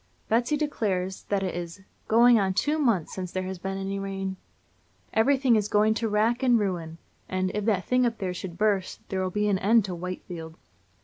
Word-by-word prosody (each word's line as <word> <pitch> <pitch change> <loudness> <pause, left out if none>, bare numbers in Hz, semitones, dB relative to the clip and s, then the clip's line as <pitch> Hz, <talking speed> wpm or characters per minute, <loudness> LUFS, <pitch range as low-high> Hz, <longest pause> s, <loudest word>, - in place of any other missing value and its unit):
Betsy 240 +7 +2
declares 195 -11 -2
that 200 -1 0
it 185 - -2
is 175 +2 -6 0.3
"going 235 +1 +6
on 190 -2 0
two 300 +8 +1
months 225 - +1
since 185 -2 -5
there 185 - -2
has 185 -1 -5
been 195 +1 -4
any 195 +1 -3
rain." 195 -1 -4 0.8
Everything 260 +2 +3
is 210 -1 +1
"going 210 +1 +3
to 225 0 -1
wrack 220 +4 +1
and 250 -2 +4
ruin," 175 -6 -2 0.3
and 185 0 -1
"if 210 -1 -2
that 200 -5 +1
thing 250 0 +2
up 235 -2 0
there 185 -3 -3
should 180 -1 -7
burst, 205 -3 0
there'll 190 -1 -1
be 210 +3 0
an 195 -2 +2
end 220 +2 +4
to 185 - -4
Whitefield." 170 -2 -7
195 Hz, 195 wpm, -26 LUFS, 185-225 Hz, 0.8 s, going